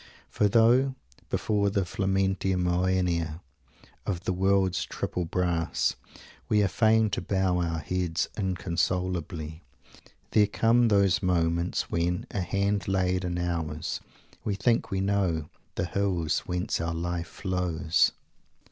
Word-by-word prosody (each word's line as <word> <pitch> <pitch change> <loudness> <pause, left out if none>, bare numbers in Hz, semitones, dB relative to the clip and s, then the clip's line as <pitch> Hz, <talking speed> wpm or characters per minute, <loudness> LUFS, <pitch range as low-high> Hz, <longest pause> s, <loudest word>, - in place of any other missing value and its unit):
For 105 - +2
though, 120 +5 +4 0.3
before 100 -2 +1
the 100 -2 0
"Flamantia 95 0 0
Moenia" 90 -2 0 0.6
of 90 -4 -2
the 95 - 0
world's 95 0 +2
triple 90 - -3
brass, 85 -1 0 0.6
we 105 -1 +4
are - - +3
fain 110 +2 +3
to 85 - -1
bow 95 -1 +1
our 85 -2 -1
heads 85 0 -1
inconsolably, 90 -4 -2 0.7
there 105 -1 +5
come 115 +3 +3
those 100 0 +3
moments 85 -2 0
when, 85 +1 0
a 100 - -1
hand 100 +1 0
laid 95 -1 +1
in 90 -1 -2
ours, 85 -2 -2 0.4
we 100 - -1
think 115 +4 +1
we 95 -1 -1
know 95 -6 0 0.2
"the 90 - -1
hills 90 -4 0
whence 90 +3 -1
our 85 0 -2
life 85 0 -2
flows"! 90 -4 +1
90 Hz, 125 wpm, -27 LUFS, 85-100 Hz, 0.7 s, there